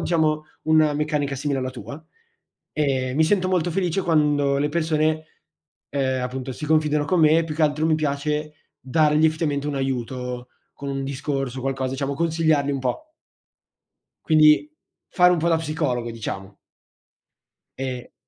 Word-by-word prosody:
diciamo, 155 -2 +1 0.2
una 155 -1 +4
meccanica 150 -2 -1
simile 140 0 -1
alla 130 0 -3
tua, 140 +5 -9 0.7
e 130 -4 0
mi 160 +2 +4
sento 185 +1 +1
molto 175 -2 +1
felice 185 +1 0
quando 145 -4 +2
le 145 +1 +1
persone, 155 -1 0 0.7
ehm, 130 -2 0
appunto, 130 +1 -4
si 150 - -6
confidano 150 -1 +2
con 180 -3 +2
me; 160 +2 +5
più 155 -2 -5
che 160 - -1
altro 155 +1 +2
mi 155 -1 +3
piace 150 +1 -2 0.3
dargli 150 +3 +2
effettivamente 150 -3 -1
un 145 - -2
aiuto, 125 -1 -3 0.3
con 140 - -7
un 135 0 -3
discorso, 135 -1 -3
o - - -6
qualcosa, 135 -1 -2
diciamo, 140 +1 -2
consigliarli 160 -2 +1
un 135 - -2
po'. 135 - -3 1.2
Quindi, 155 - +5 0.4
fare 180 0 +5
un 175 - +1
po' 170 +2 +1
da 165 -1 +3
psicologo, 145 -7 -2
diciamo. 100 -3 -6 1.2
Ehm 130 -2 -5
150 Hz, 150 wpm, -23 LUFS, 135-155 Hz, 1.2 s, me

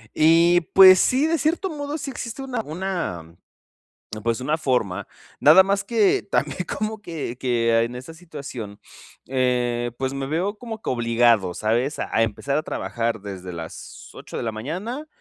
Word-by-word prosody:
Y 165 +3 +5
pues 185 -1 +9
sí, 270 +4 +3
de 330 +1 +1
cierto 330 +6 0
modo, 290 -1 -4
sí 290 -2 -5
existe 240 0 -6
una 255 -3 -3
una 170 - -4 0.9
pues, 115 +2 -1
una 150 +4 0
forma, 110 - -1 0.3
nada 190 - +8
más 195 +1 0
que 220 -4 +2
también - - 0 0.2
como 215 0 -3
que 160 - -6
que 115 -3 +2
en 120 +1 -6
esa 130 +6 -9
situación, 140 - -8 0.5
eh, 125 -2 0
pues, 130 +1 -2
me 135 0 -4
veo 180 +8 -2
como 225 -2 -7
que - - -3
obligado, 115 -5 +2
¿sabes? 120 - -1
A - - -1
empezar 115 +6 -1
a - - -2
trabajar 115 -6 -3
desde 95 -3 -7
las 80 -1 -9
8 - - -10
de - - -3
la 115 - -2
mañana 185 - -5
140 Hz, 160 wpm, -23 LUFS, -, 0.9 s, pues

